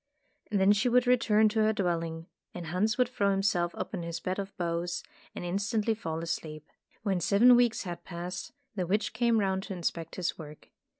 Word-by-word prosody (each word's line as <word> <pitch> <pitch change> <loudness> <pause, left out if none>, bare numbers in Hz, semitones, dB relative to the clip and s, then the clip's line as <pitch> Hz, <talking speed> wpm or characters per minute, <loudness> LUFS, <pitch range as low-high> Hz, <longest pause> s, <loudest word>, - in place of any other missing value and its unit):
Then 200 -1 +4
she 210 +5 +3
would 250 +1 +4
return 230 -3 +4
to 220 +1 -1
her 215 0 +3
dwelling, 165 -4 -2 0.3
and 175 -1 -5
Hans 190 +6 0
would 250 - +3
throw 210 -5 0
himself 195 -3 +1
upon - - -4
his 170 0 -4
bed 185 +2 -3
of 195 0 -6
boughs, 175 0 -2 0.3
and - - -5
instantly 205 +5 0
fall 165 -7 -4
asleep. 155 -2 -5 0.4
When 195 -4 +1
seven 225 +8 +6
weeks 240 -2 +3
had 175 -3 -6
passed, 175 +1 -6 0.2
the 185 -4 -2
witch 205 +4 0
came 235 -2 +2
round 190 -2 0
to 195 - -5
inspect 165 -2 -3
his 180 -1 -2
work. 150 -1 -11
190 Hz, 185 wpm, -29 LUFS, 170-215 Hz, 0.4 s, seven